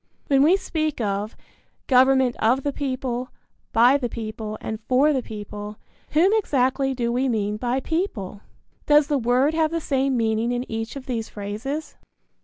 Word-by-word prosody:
When 275 -1 +4
we 335 +7 +5
speak 310 -6 -2
of 205 0 -2 0.5
"Government 260 -1 +4
of 250 +4 +2
the 285 - -1
people, 255 -2 -3 0.4
by 245 +5 +5
the 245 -3 -2
people, 215 -1 -5
and 220 -1 -5
for 275 +4 +4
the 265 - 0
people," 210 -1 -8 0.4
whom 340 +6 +4
exactly 270 - +1
do 235 -1 -1
we 255 +2 +1
mean 210 -2 -1
by 250 +3 -1
"people"? 260 - -3 0.5
Does 295 0 +6
the 285 -1 0
word 250 +5 +2
have 320 -1 +2
the 330 +1 -2
same 270 -3 0
meaning 225 +1 +1
in 245 +1 -2
each 225 +2 -4
of 275 -2 -7
these 230 -3 -3
phrases? 225 +10 -5
255 Hz, 165 wpm, -23 LUFS, 225-280 Hz, 0.5 s, Does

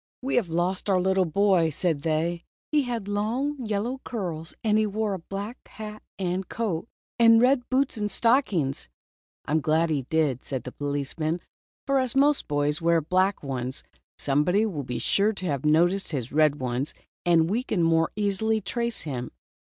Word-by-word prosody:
"We 270 - -2
have 210 -8 +1
lost 180 +4 -1
our 190 -2 +4
little 190 0 +2
boy," 180 -1 +3
said 160 -1 0
they. 165 +2 -1
" - - -92
He 300 -1 +4
had 235 -5 -3
long 245 +7 -1
yellow 225 +5 -2
curls; 175 -8 -5
and 215 -1 +3
he 215 - +2
wore 210 0 -1
a 190 - -4
black 200 +7 -7
hat 215 0 -8 0.2
and 185 0 -2
coat, 215 -5 -2 0.3
and 230 -1 +7
red 250 +1 +3
boots 260 -1 +1
and 210 -1 -1
stockings." 200 - +1 0.6
"I - - -5
am 155 +1 +3
glad 160 +2 +2
he 135 -4 -1
did," 150 -6 +1
said 130 -4 -4
the 125 - -7
policeman, 145 +4 -2 0.5
"for 275 0 +2
as 255 -1 -1
most 285 +1 +3
boys 145 +2 0
wear 170 0 +3
black 185 +5 +1
ones, 130 -2 -4 0.3
somebody 165 +10 +2
will 175 -10 -3
be 125 -1 -4
sure 205 +2 +2
to 190 - -6
have 145 -4 -2
noticed 175 +6 +3
his 125 -4 -3
red 150 -1 +4
ones, 130 +2 -2 0.3
and 165 -2 +4
we 215 +7 0
can 210 -9 -1
more 165 0 +3
easily 210 +2 +1
trace 235 +4 -2
him." 125 -5 -4
185 Hz, 180 wpm, -26 LUFS, 155-220 Hz, 0.6 s, and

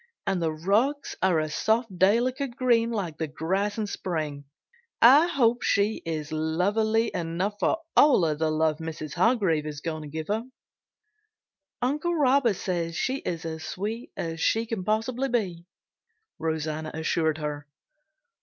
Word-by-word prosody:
And 190 -2 0
the 165 -1 +1
rugs 210 - 0
are 185 -4 +3
a 155 - -1
soft 220 +6 0
delicate 240 +7 +2
green 235 -2 +2
like 190 -9 -3
the 160 - -1
grass 190 +8 -1
in 215 - -1
spring. 155 -8 -4 0.5
I 280 +8 +7
hope 245 -7 +2
she 205 +1 +1
is 155 -2 -4
lovely 205 +9 +1
enough 175 +5 -2
for 325 - +2 0.2
all 290 -9 +6
the 160 -1 +1
love 155 0 +1
Mrs. 155 -2 -6
Hargrave 180 -6 +2
is 150 -1 -5
going 155 0 -4
to 150 - -8
give 155 +3 -6
her." 215 +2 +1 1.4
"Uncle 300 +7 0
Robert 270 -6 +3
says 170 -3 -2
she 260 +9 0
is 170 -11 -4
as 160 -1 -5
sweet 220 +5 -5
as 165 -1 -4
she 225 +1 +2
can 225 -4 -4
possibly 230 +6 0
be," 185 -8 -2 0.7
Rosanna 155 -1 -2
assured 160 -1 0
her. 150 -1 -5
185 Hz, 145 wpm, -26 LUFS, 160-230 Hz, 1.4 s, I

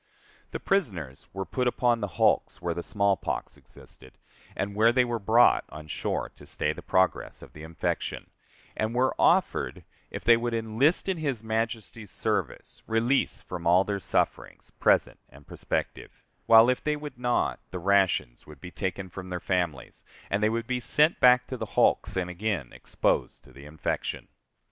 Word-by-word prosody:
The - - -5
prisoners 90 - -2
were 95 0 -4
put 125 +8 -1
upon 120 -1 +2
the 100 - -1
hulks, - - +2
where 85 -1 -2
the 85 - -4
small 100 +1 +1
pox - - -4
existed, 65 - -15 0.4
and 100 +1 -3
where 110 +3 +4
they 125 0 +3
were 120 -1 -2
brought 110 +4 +4
on 75 0 -10
shore - - -3
to - - -13
stay - - -1
the - - -10
progress 95 0 0
of - - -14
the 75 - -11
infection, 80 +1 -4 0.4
and 110 +2 -2
were 130 +1 +2
offered, 170 - +2 0.3
if - - -7
they 115 -1 +6
would 120 0 -2
enlist 115 - +1
in 190 -2 0
his 140 -8 -2
Majesty's 110 -1 -3
service, - - -3
release 115 +4 +1
from 85 -2 -5
all 90 +2 +5
their 100 0 -3
sufferings, - - -2
present - - +2
and 70 +3 -17
prospective; - - -5 0.2
while, 115 0 +8
if 125 0 0
they 150 0 0
would 150 -4 -8
not, 120 -1 0
the 90 - -6
rations 95 -9 +1
would 75 -2 -13
be 90 +5 -9
taken 95 0 -4
from 95 +1 -9
their 90 -1 -3
families, 85 -7 -3 0.3
and 100 - +1
they 110 - +3
would 115 +1 -2
be 125 -1 -1
sent 150 +7 +2
back 125 0 +6
to 130 - -6
the - - -5
hulks - - +2
and 90 -1 -1
again 90 - -3
exposed - - -1
to - - -18
the 70 +1 -13
infection. 75 +1 -4
110 Hz, 175 wpm, -27 LUFS, 90-120 Hz, 0.4 s, while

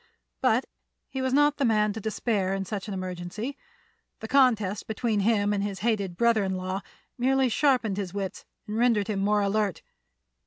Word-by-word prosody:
But - - +3 0.4
he 265 - -4
was 260 0 0
not 290 +2 +4
the 280 - 0
man 215 -3 +2
to 220 - -6
despair 205 -3 -1
in 195 0 -3
such 205 +1 -5
an 205 - -4
emergency; 185 +7 -5 0.6
the 220 - -6
contest 220 -7 +2
between 220 -1 0
him 205 0 +2
and 200 -1 0
his 200 -2 -4
hated 200 -6 0
brother 230 -2 +3
in 190 -1 -1
law 185 +1 -3 0.4
merely 265 +1 +3
sharpened 240 -5 +2
his 195 -3 -3
wits 195 -1 -4 0.2
and 210 +1 -4
rendered 230 -4 +3
him 205 -2 -1
more 205 +1 +2
alert. 200 -2 0
210 Hz, 180 wpm, -27 LUFS, 195-235 Hz, 0.6 s, not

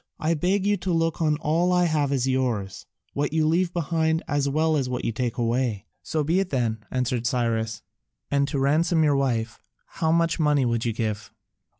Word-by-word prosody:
I 160 +2 +1
beg 185 +5 0
you 205 0 +2
to 180 0 -3
look 165 0 0
on 155 -2 +2
all 170 +4 +1
I 180 0 +3
have 150 -4 +1
as 135 -2 0
yours, 125 -7 -2 0.3
what 145 +1 -1
you 160 -1 +2
leave 170 +3 +2
behind 160 -1 0
as 145 -1 0
well 155 +2 +1
as 135 -4 -1
what 125 -1 -3
you - - 0
take 120 +1 -3
away." 115 -3 -1 0.2
"So 155 -1 -2
be 165 +6 +1
it 195 -1 -1
then," 115 -5 -1
answered 125 -2 -1
Cyrus, 115 -3 -1 0.5
"and 140 0 +2
to 145 - -3
ransom 160 +4 +2
your 145 -2 +3
wife, 120 -5 -1 0.2
how 160 -1 -1
much 165 0 +1
money 150 -4 +3
would 115 -1 0
you 115 - +1
give?" 105 -2 -3
145 Hz, 200 wpm, -25 LUFS, 120-160 Hz, 0.5 s, I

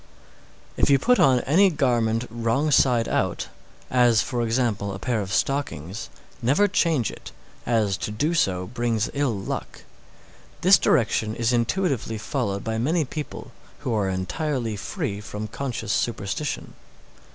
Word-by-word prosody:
622. - - -3
If - - +5
you 140 - +6
put 250 - +3
on 130 -2 +5
any 190 +8 +4
garment 120 -7 +1
wrong 120 +6 0
side 125 -4 +4
out, - - -1 0.4
as, 120 -3 +4
for 120 -2 -2
example, 115 -4 0
a - - -5
pair 115 +1 -1
of 95 -1 -5
stockings, 115 - -2 0.3
never 140 - +3
change 160 - +1
it, - - -11 0.4
as 110 -5 +1
to - - -4
do 145 +11 0
so 90 - +1
brings 115 0 -1
ill 140 -7 0
luck. 95 - -5 0.8
This 190 +2 +7
direction 110 -2 +1
is 115 +1 +1
intuitively 120 - 0
followed 110 -3 -2
by 110 0 -2
many 155 +6 +1
people 150 +3 -7 0.3
who 125 - -2
are 100 -3 +1
entirely 115 - -2
free 105 - -4
from 105 0 -6
conscious 120 -4 -4
superstition. 120 +5 -2
120 Hz, 145 wpm, -24 LUFS, 110-140 Hz, 0.8 s, This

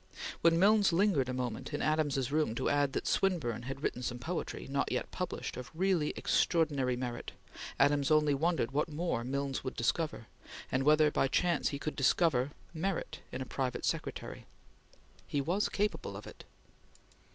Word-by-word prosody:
When 165 0 +5
Milnes 205 +2 +5
lingered 165 -8 +2
a - - 0
moment 125 +2 -3
in - - -3
Adams's 145 -4 +1
room 150 -7 +1
to - - 0
add 145 -2 +2
that - - -2
Swinburne 150 - 0
had 135 +2 -6
written 125 - -1
some 120 -1 -3
poetry, 165 +8 -4
not 140 0 -1
yet - - -2
published, 180 -2 -4
of 125 -1 -7
really 180 -3 +2
extraordinary 145 -7 +1
merit, 120 -1 -5 0.5
Adams 145 0 +3
only 155 -1 +4
wondered 160 -3 +1
what 150 +3 0
more 155 -6 -1
Milnes 140 +1 -2
would 130 - -4
discover, 135 +1 -1 0.5
and 130 - +1
whether 150 +2 +5
by 135 - +2
chance 170 +4 +1
he 140 - -3
could 155 +2 -4
discover 135 -2 +3 0.2
merit 180 +3 -2
in 130 +1 -3
a - - -10
private 130 -2 -2
secretary. - - -3 0.8
He 145 - -1
was 175 +9 0
capable 210 +1 -2
of - - -10
it. - - -12
145 Hz, 165 wpm, -32 LUFS, 130-165 Hz, 0.8 s, When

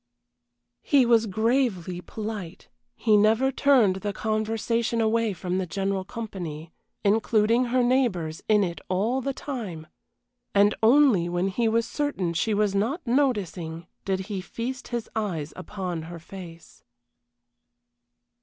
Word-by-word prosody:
He 275 -3 +4
was 230 -1 +4
gravely 210 -5 0
polite, 210 -4 -7 0.3
he 220 -2 +3
never 220 +6 +4
turned 250 -9 +4
the 205 +1 -3
conversation 225 +2 -1
away 225 0 +2
from 185 0 -2
the 185 - -2
general 195 +2 -1
company, 175 -8 -6 0.3
including 220 +3 +3
her 250 +1 +2
neighbors 220 -11 +1
in 210 -1 +5
it 170 -2 -4
all 215 +8 +1
the 275 - -1
time, 220 - -6 0.7
and 205 +1 +5
only 225 -7 +5
when 175 +2 0
he 230 +4 0
was 230 +1 +1
certain 290 - -2
she 210 +6 0
was 205 -1 +1
not 235 - -1
noticing 200 - 0 0.2
did 190 -1 -1
he 195 0 -4
feast 250 +7 -5
his 240 -2 -3
eyes 175 -9 -2
upon 185 -3 -5
her 170 +2 -8
face. 170 0 -12
210 Hz, 130 wpm, -26 LUFS, 185-235 Hz, 0.7 s, in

